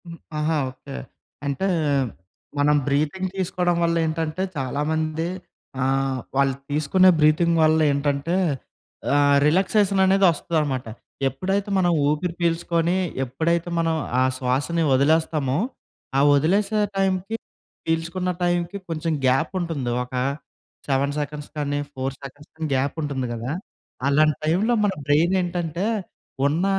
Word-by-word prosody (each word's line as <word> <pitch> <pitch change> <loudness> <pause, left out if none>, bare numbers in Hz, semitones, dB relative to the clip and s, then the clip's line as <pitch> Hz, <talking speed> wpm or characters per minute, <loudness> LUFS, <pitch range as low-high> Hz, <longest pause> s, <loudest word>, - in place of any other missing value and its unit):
హ్మ్. 170 -1 -9 0.2
ఆహా! 155 +1 +1
ఓకే. 130 - -10 0.5
అంటే 140 +8 -1 0.9
మనం 150 +1 +4
బ్రీతింగ్ 155 +7 0
తీసుకోవడం 180 -1 0
వల్లేంటంటే, 165 +1 0
చాలామంది 155 +4 -1 0.5
ఆహ్, 135 0 +1 0.2
వాళ్ళు 135 -1 +2 0.2
తీసుకునే 155 +6 +4
బ్రీతింగ్ 160 +2 +4
వల్లేంటంటే, 150 0 +2 0.8
ఆ - - +5 0.3
రిలాక్సేషన్ 195 +4 +3
అనేది 195 +1 +4
వస్తదన్నమాట. 150 -6 -1 0.4
ఎప్పుడైతే 195 - -2
మనం 175 -2 +3 0.2
ఊపిరి 155 +4 0
పీల్చుకొని, 170 +1 +1 0.3
ఎప్పుడైతే 165 +7 -1
మనం 165 -1 +1 0.3
ఆ - - +5
శ్వాసని 135 +7 0
వదిలేస్తామో 145 -1 +2 0.6
ఆ - - +5 0.2
వదిలేసే 200 +8 +2 0.2
టైంకి 195 +2 0 0.5
పీల్చుకున్న 165 +3 -1
టైంకి 175 +2 0
కొంచెం 165 0 -1
గ్యాప్ 130 +6 +2
ఉంటుంది. 155 -8 -2
ఒక 125 - -13 0.7
7 140 +1 +1
సెకండ్స్ 150 0 -5
కానీ, 145 -1 -1
4 135 +1 -3
సెకండ్స్ 140 +2 -11
కానీ 160 0 -3
గ్యాప్ 135 +2 0
ఉంటుంది 140 -3 -2
కదా! 120 +3 -4 0.6
అలాంటి 150 +1 +3
టైంలో 195 +10 +2
మన 200 - +1
బ్రెయిన్ 160 +6 +3
ఏంటంటే, 175 0 -2 0.6
ఉన్న 160 +6 0
160 Hz, 115 wpm, -23 LUFS, 140-175 Hz, 0.9 s, ఆ